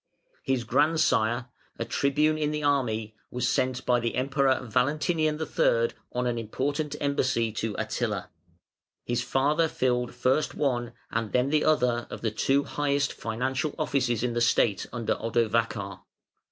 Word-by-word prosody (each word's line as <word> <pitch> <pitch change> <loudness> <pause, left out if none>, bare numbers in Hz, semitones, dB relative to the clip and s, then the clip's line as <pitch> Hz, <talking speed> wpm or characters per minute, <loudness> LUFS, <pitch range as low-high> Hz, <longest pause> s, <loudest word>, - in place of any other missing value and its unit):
His 130 -3 0
grandsire, 125 -3 +2 0.3
a - - -2
Tribune 150 +3 +2
in 150 -1 0
the 150 0 -3
army, 115 -7 0
was 125 - -1
sent 130 0 0
by 125 -1 +3
the 115 -1 -2
Emperor 135 +1 +2
Valentinian 150 +6 +1
III. 115 -6 +2 0.2
on 125 0 -1
an 120 -1 0
important 145 +7 -2
embassy 130 -5 +1
to 110 0 -3
Attila. 110 -3 -2 0.7
His 120 0 0
father 145 +6 +2
filled 125 -4 -1
first 130 +4 +1
one 120 -5 -1 0.2
and 115 -2 -2
then 125 +2 +2
the 155 -1 +3
other 125 -6 +2
of - - -7
the 110 - 0
two 135 +6 +2
highest 140 0 0
financial 130 +6 -2
offices 130 -7 0
in 125 -1 0
the 120 - 0
State 110 -3 +2
under 115 -2 -1
Odovacar. 115 0 -1
125 Hz, 145 wpm, -27 LUFS, 115-145 Hz, 0.7 s, by